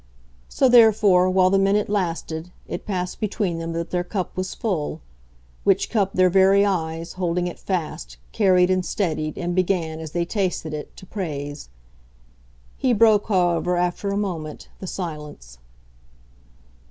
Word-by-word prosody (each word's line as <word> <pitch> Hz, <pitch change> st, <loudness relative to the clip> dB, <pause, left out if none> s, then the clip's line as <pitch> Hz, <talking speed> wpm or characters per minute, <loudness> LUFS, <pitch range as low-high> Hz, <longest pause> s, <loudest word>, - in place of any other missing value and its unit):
So, 265 Hz, -, +3 dB
therefore, 210 Hz, -6 st, +6 dB
while 185 Hz, 0 st, +3 dB
the 195 Hz, -, +4 dB
minute 200 Hz, +2 st, +2 dB
lasted, 170 Hz, -4 st, -3 dB, 0.2 s
it -, -, -6 dB
passed 180 Hz, -3 st, -3 dB
between 200 Hz, -5 st, -1 dB
them 165 Hz, 0 st, -4 dB
that 170 Hz, 0 st, -4 dB
their 180 Hz, -1 st, 0 dB
cup 185 Hz, 0 st, -4 dB
was 185 Hz, 0 st, -3 dB
full; 185 Hz, -11 st, -2 dB, 0.6 s
which -, -, +2 dB
cup 200 Hz, -4 st, +1 dB
their 185 Hz, 0 st, +4 dB
very 195 Hz, +2 st, +5 dB
eyes, 165 Hz, -3 st, -2 dB
holding 180 Hz, -1 st, -1 dB
it 175 Hz, -, -5 dB
fast, 155 Hz, -, -4 dB
carried 185 Hz, -2 st, +3 dB
and 185 Hz, 0 st, +1 dB
steadied 155 Hz, -6 st, -2 dB
and 175 Hz, -1 st, -2 dB
began, 175 Hz, -3 st, 0 dB
as 160 Hz, -1 st, -6 dB
they 170 Hz, +2 st, -1 dB
tasted 180 Hz, -5 st, -2 dB
it, 150 Hz, -1 st, -7 dB
to -, -, -11 dB
praise. 145 Hz, -, -5 dB, 1.1 s
He 255 Hz, -2 st, +2 dB
broke, 215 Hz, -2 st, +4 dB
however, 180 Hz, -3 st, +1 dB
after 180 Hz, +3 st, -1 dB
a 200 Hz, -, -1 dB
moment, 165 Hz, -7 st, -4 dB
the 190 Hz, -, -7 dB
silence. 150 Hz, -, -7 dB
180 Hz, 150 wpm, -23 LUFS, 165-195 Hz, 1.1 s, therefore